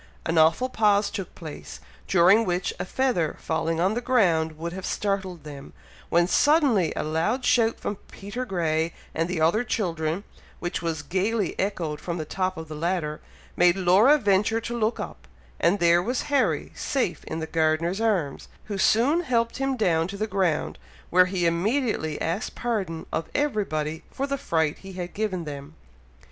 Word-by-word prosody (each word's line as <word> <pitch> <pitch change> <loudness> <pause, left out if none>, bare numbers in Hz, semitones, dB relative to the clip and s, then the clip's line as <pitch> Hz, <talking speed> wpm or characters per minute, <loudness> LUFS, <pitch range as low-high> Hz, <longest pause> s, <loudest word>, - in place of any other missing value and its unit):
An 165 0 +2
awful 165 +11 +4
pause 210 -4 +2
took 190 -3 -6
place, 160 -4 -9 0.3
during 190 +5 +5
which, 180 -2 -1
a - - -2
feather 210 - 0
falling 160 +1 -1
on 185 +4 +2
the 240 - -2
ground 170 -11 +2
would 170 +2 -5
have 190 +1 -6
startled 190 -5 -2
them, 145 -2 -10 0.4
when 170 +1 +4
suddenly 265 - +3
a - - -1
loud 165 - 0
shout 230 -3 +3
from 205 - -3
Peter 205 +6 -5
Grey 165 -6 -1 0.2
and 165 +2 -1
the 180 -2 -2
other 170 +9 +3
children, 170 -6 -2 0.3
which 175 0 -3
was 160 -3 -2
gaily 195 +4 0
echoed 170 -6 -2
from 170 -1 -3
the 155 - -4
top 185 +3 -2
of 160 0 -7
the 155 - -7
ladder, 155 -1 -2 0.3
made 175 0 +5
Laura 195 +10 +5
venture 210 -1 +2
to 235 +1 -5
look 225 0 0
up, - - -7 0.3
and 195 - +3
there 170 -1 +4
was 245 +7 -1
Harry 275 -2 +1
safe 255 -11 -2
in 160 - -4
the 160 - -3
gardener's 165 +5 0
arms, 185 -11 0 0.2
who 200 -2 -5
soon 265 - +3
helped 235 -6 0
him 270 -1 -1
down 165 -7 +2
to 200 +1 -7
the 215 - -1
ground, 190 -7 -1 0.3
where 180 +1 +6
he 180 -2 -1
immediately 175 - 0
asked 170 +6 -2
pardon 195 -9 -2
of 160 - -2
everybody 160 - -1
for 275 - -3
the 280 -1 -3
fright 160 -7 0
he 195 0 -10
had 180 -1 -6
given 195 -5 -2
them. 140 -2 -8
185 Hz, 175 wpm, -25 LUFS, 165-220 Hz, 0.4 s, where